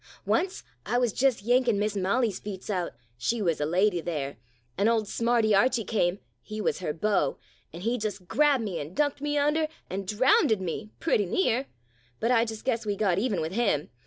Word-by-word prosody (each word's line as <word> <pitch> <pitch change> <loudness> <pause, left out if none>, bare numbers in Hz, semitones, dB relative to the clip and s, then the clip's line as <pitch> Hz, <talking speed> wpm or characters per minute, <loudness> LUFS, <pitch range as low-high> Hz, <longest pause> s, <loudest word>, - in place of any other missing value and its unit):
Onct 370 +3 0 0.2
I 245 - 0
wuz 245 -1 +2
just 255 -6 +1
yankin' 245 -1 +3
Miss 210 0 0
Molly's 200 +3 +1
feets 200 0 -6
out 180 -3 -2 0.2
— 120 - -40
she 235 - +1
wuz 170 -6 +1
a 150 - +1
lady 180 +1 +2
there 145 -5 -4 0.2
— 120 0 -40
an' 200 - +3
old 225 -2 +2
smarty 230 -1 +2
Archie 235 +3 +3
came 190 -5 +1
out - - -21 0.2
— - - -48
he 215 0 -4
wuz 210 - 0
her 175 -4 -2
beau 165 -3 0 0.2
— - - -37
an' 170 - -9
he 235 +5 0
just 205 -4 -4
grabbed 285 +1 +3
me 195 -5 -3
an' 150 +5 -7
ducked 290 -2 0
me 295 0 -1
under, 300 +2 +2 0.2
an' 195 +1 -3
drownded 250 - +3
me 190 +4 -4
— - - -40
pretty 215 - +1
near. 255 - +1 0.5
But 230 +3 +1
I 230 -2 +4
just 220 0 -7
guess 240 -3 0
we 205 -2 -1
got 195 -3 +1
even 205 -6 0
with 160 +1 -3
him. 200 -10 0
215 Hz, 220 wpm, -27 LUFS, 185-245 Hz, 0.5 s, I